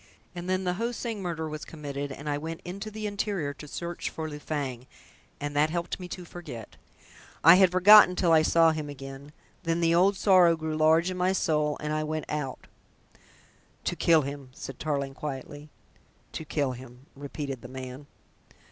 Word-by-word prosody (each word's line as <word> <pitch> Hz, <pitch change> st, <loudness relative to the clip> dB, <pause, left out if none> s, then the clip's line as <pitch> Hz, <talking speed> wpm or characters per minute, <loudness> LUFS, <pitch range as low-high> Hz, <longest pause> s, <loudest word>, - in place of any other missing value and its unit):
And 175 Hz, 0 st, -6 dB
then 185 Hz, 0 st, +1 dB
the 180 Hz, -1 st, 0 dB
Ho 230 Hz, +6 st, -2 dB
Sing 230 Hz, -3 st, -4 dB
murder 165 Hz, -3 st, -3 dB
was 155 Hz, 0 st, -6 dB
committed, 145 Hz, -2 st, -6 dB
and 145 Hz, +3 st, -8 dB
I 145 Hz, -, 0 dB
went 160 Hz, +3 st, -5 dB
into 195 Hz, +4 st, -6 dB
the 215 Hz, 0 st, -6 dB
interior 200 Hz, -7 st, -2 dB
to 145 Hz, +2 st, -11 dB
search 170 Hz, +3 st, -4 dB
for 160 Hz, -1 st, -5 dB
Lu 150 Hz, -1 st, -7 dB
Fang, 135 Hz, -5 st, -4 dB, 0.5 s
and 145 Hz, 0 st, -4 dB
that 150 Hz, +2 st, +3 dB
helped 170 Hz, +3 st, -3 dB
me 180 Hz, -, -7 dB
to 180 Hz, 0 st, -7 dB
forget. 150 Hz, -11 st, -9 dB, 0.7 s
I 165 Hz, -, +10 dB
had 190 Hz, -2 st, +5 dB
forgotten 185 Hz, 0 st, +8 dB
till 175 Hz, -2 st, +2 dB
I 160 Hz, -1 st, +6 dB
saw 165 Hz, +1 st, +5 dB
him 155 Hz, -2 st, -4 dB
again. 135 Hz, +1 st, -9 dB, 0.3 s
Then 165 Hz, -2 st, 0 dB
the 165 Hz, -1 st, +3 dB
old 190 Hz, +3 st, +4 dB
sorrow 180 Hz, -4 st, +5 dB
grew 160 Hz, -1 st, -3 dB
large 160 Hz, +3 st, +4 dB
in 185 Hz, -, -5 dB
my 185 Hz, +1 st, +2 dB
soul, 150 Hz, -4 st, +1 dB
and 150 Hz, 0 st, -2 dB
I 155 Hz, 0 st, 0 dB
went 155 Hz, 0 st, -3 dB
out 150 Hz, -3 st, -4 dB, 0.6 s
" -, -, -30 dB
"To -, -, -1 dB
kill 165 Hz, -3 st, +4 dB
him," 140 Hz, -1 st, -6 dB
said 135 Hz, -1 st, -8 dB
Tarling 140 Hz, -3 st, -2 dB
quietly. 145 Hz, +1 st, -7 dB, 0.6 s
"To 160 Hz, -, -6 dB
kill 145 Hz, -3 st, 0 dB
him," 125 Hz, +1 st, -11 dB
repeated 140 Hz, -2 st, -6 dB
the 125 Hz, -, -9 dB
man. 130 Hz, +2 st, -8 dB
155 Hz, 190 wpm, -28 LUFS, 145-175 Hz, 0.7 s, I